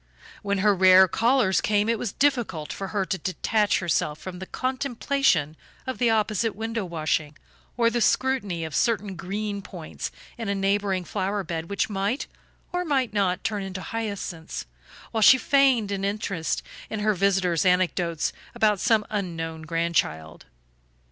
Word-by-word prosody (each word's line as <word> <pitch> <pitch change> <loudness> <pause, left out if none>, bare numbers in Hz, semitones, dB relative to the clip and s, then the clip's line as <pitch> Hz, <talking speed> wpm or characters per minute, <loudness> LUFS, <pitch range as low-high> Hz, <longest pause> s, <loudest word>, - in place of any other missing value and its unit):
When 200 -1 -1
her 210 - +6
rare 185 0 +7
callers 230 0 +2
came 210 0 +1
it 230 -1 +1
was 225 - -2
difficult 240 - 0
for 195 - -5
her 195 -1 -1
to 190 0 -2
detach 210 +3 +1
herself 155 -3 0
from 180 +3 -8
the 190 - -7
contemplation 255 - 0 0.3
of 260 -1 -4
the 240 -2 +3
opposite 220 0 +1
window 225 +1 -3
washing, 155 -2 -2 0.4
or 230 -1 +3
the 240 - 0
scrutiny 215 -11 +1
of 160 - -7
certain 210 -4 0
green 200 +3 -4
points 175 -5 -7 0.3
in 225 -3 -3
a 200 - 0
neighboring 195 -1 0
flower 195 +3 -2
bed 165 -2 -5
which 200 - 0
might, 205 +5 -1 0.5
or 355 0 0
might 265 -9 0
not, 190 -3 0
turn 210 -2 -1
into 190 -1 -5
hyacinths, 200 -7 -5 0.5
while 220 - -1
she 260 +5 +8
feigned 260 -6 +3
an 195 -1 -2
interest 195 -4 -2 0.3
in 220 -1 -3
her 215 0 +2
visitor's 190 -3 +2
anecdotes 180 -3 +1 0.2
about 210 -2 +3
some 220 -1 +2
unknown 165 -5 -3
grandchild. 160 - -1
200 Hz, 155 wpm, -25 LUFS, 180-225 Hz, 0.5 s, she